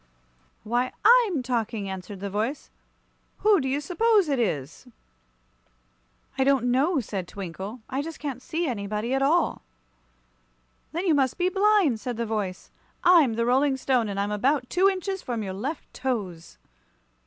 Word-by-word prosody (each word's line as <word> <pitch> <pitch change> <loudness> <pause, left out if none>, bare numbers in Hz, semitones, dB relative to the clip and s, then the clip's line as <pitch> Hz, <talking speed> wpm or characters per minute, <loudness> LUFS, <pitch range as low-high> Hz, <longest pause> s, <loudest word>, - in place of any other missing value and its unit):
"Why, 245 +3 -1
I'm 445 - +5
talking," 230 -4 -2
answered 190 0 -7
the 200 - -3
voice. 225 +8 -3 0.7
"Who 415 -5 +4
do 265 - -2
you 275 +2 0
suppose 405 +3 +2
it 275 -3 +1
is?" 160 - -2 1.5
"I - - +5
don't 265 -3 +2
know," 285 +6 +2
said 195 -5 -5
Twinkle. 195 +5 -7
"I 265 +2 -2
just 325 +2 -7
can't 275 -4 -5
see 330 +6 -2
anybody 215 -1 -2
at 270 - +1
all." 320 +6 +2 1.3
"Then 345 +4 -3
you 340 - +4
must 270 -3 +1
be 360 0 +2
blind," 390 - +3
said 245 0 -5
the 235 - -1
voice. 210 -4 -4 0.3
"I'm 335 -9 +6
the 230 +1 0
Rolling 265 +3 +2
Stone, 255 -4 +1
and 200 0 -3
I'm 200 +1 -1
about 250 +5 0
two 375 +2 +4
inches 385 0 -3
from 235 -3 -3
your 190 -2 -4
left 270 +11 -5
toes." 200 -10 -4
255 Hz, 155 wpm, -26 LUFS, 210-315 Hz, 1.5 s, I'm